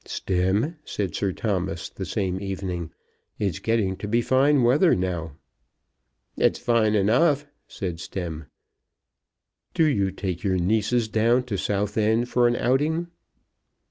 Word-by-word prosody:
"Stemm," 100 - -1
said 100 - -3
Sir 100 -2 -1
Thomas 95 -4 -2
the - - -7
same 95 -1 -2
evening, 95 -4 -4 0.5
"it's 95 -6 -2
getting 110 -4 0
to 105 - -6
be 115 +3 +2
fine 135 +3 +3
weather 145 +9 +4
now." 85 -4 -3 1.0
"It's - - +2
fine 110 -3 +2
enough," 135 - +3 0.2
said 90 -5 -5
Stemm. 80 -4 -6 1.3
"Do 165 - +4
you 100 -11 +2
take 95 -2 -4
your 95 -2 +1
nieces 110 +5 +1
down 115 +3 +2
to 120 -5 -4
Southend 105 +4 0
for 120 -1 +3
an 120 - +1
outing. 150 +8 0
105 Hz, 130 wpm, -24 LUFS, 95-120 Hz, 1.3 s, weather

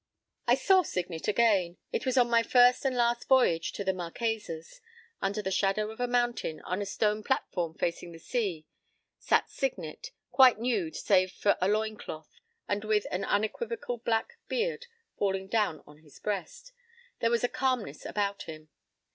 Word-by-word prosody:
p> - - +6
I - - +6
saw 380 -1 +4
Signet 180 - -4
again. 205 -6 +3
It 230 - -2
was 260 0 +1
on 245 -1 +5
my 235 -1 +4
first 245 +3 +5
and 260 -2 +1
last 240 0 +1
voyage 245 -12 +3
to 200 - -4
the 190 -1 +1
Marquesas. 180 -2 -4 0.4
Under 205 +2 -1
the 190 - -2
shadow 200 +3 +1
of 220 - -12
a 245 - 0
mountain, 240 -9 0
on 185 +3 -3
a 200 - -3
stone 210 +1 0
platform 175 -8 -1
facing 170 0 -3
the 165 - -10
sea, 180 -4 -2 0.5
sat - - +2
Signet, - - -4 0.2
quite 260 -4 +7
nude 220 -9 -1
save 185 -2 +3
for 200 +1 +2
a 185 - +3
loin 215 +1 0
cloth, 155 -5 -9 0.3
and 205 +1 -1
with 215 -1 +1
an 185 +2 -1
unequivocal 240 - -2
black 230 - -1
beard 485 0 -2 0.3
falling 195 -1 0
down 210 -7 0
on 150 0 -16
his 155 -2 -18
breast. 205 - -4 0.5
There 230 - +2
was 235 0 +1
a - - +4
calmness 245 - -1
about 200 -1 -2
him. 155 -1 -9
210 Hz, 170 wpm, -29 LUFS, 185-240 Hz, 0.5 s, quite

